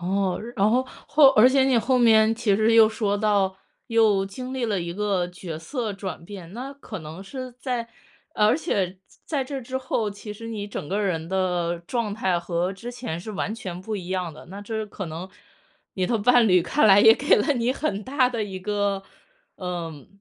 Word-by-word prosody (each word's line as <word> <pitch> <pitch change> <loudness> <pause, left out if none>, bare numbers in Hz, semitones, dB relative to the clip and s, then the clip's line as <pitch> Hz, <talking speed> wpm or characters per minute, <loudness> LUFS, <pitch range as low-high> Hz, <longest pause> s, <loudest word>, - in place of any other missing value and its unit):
哦， 190 +1 0 0.2
然 200 0 +3
后， 255 +3 +2 0.2
或 300 -2 +6
而 245 0 +6
且 265 0 +3
你 265 -2 +3
后 250 +3 +2
面 220 -2 +5
其 225 -3 +1
实 220 +3 +3
又 225 -1 +8
说 210 -2 -1
到， 200 -3 +1 0.3
又 220 -4 +3
经 250 +7 -7
历 255 -2 -1
了 205 -4 0
一 170 0 -4
个 200 -3 0
角 175 -3 -7
色 225 - -4
转 195 -3 -6
变。 185 -2 -10
那 255 +5 -6
可 235 -8 -8
能 160 +4 -9
是 255 +5 -7
在 245 -3 -3 0.5
而 210 +4 +4
且 195 - -2 0.3
在 290 -4 -1
这 270 +1 -5
之 255 +1 -5
后， 240 -4 -1
其 205 +1 -8
实 230 +2 -9
你 210 -3 -4
整 150 - -6
个 200 +3 -1
人 165 -5 -1
的 180 -2 0
状 210 +3 -2
态 190 -5 0
和 175 +1 -2
之 235 +5 -8
前 240 -10 -5
是 215 +5 -7
完 205 +1 -2
全 185 -6 -6
不 215 +3 -4
一 180 -3 -7
样 185 -3 -2
的， 155 - -13
那 195 +3 -9
这 220 +1 -4
可 200 -3 -6
能 165 +4 -6 0.7
你 185 -1 0
的 235 - +1
伴 245 +2 +5
侣 180 -3 +5
看 220 - +2
来 200 -1 +7
也 220 +1 +9
给 285 +5 +3
了 295 - +2
你 240 0 +1
很 215 -8 -3
大 260 -1 +2
的 230 -3 -2
一 190 -2 -7
个， 200 0 -1 0.5
呃， 170 -6 -5
205 Hz, 220 characters per minute, -24 LUFS, 185-235 Hz, 0.7 s, 也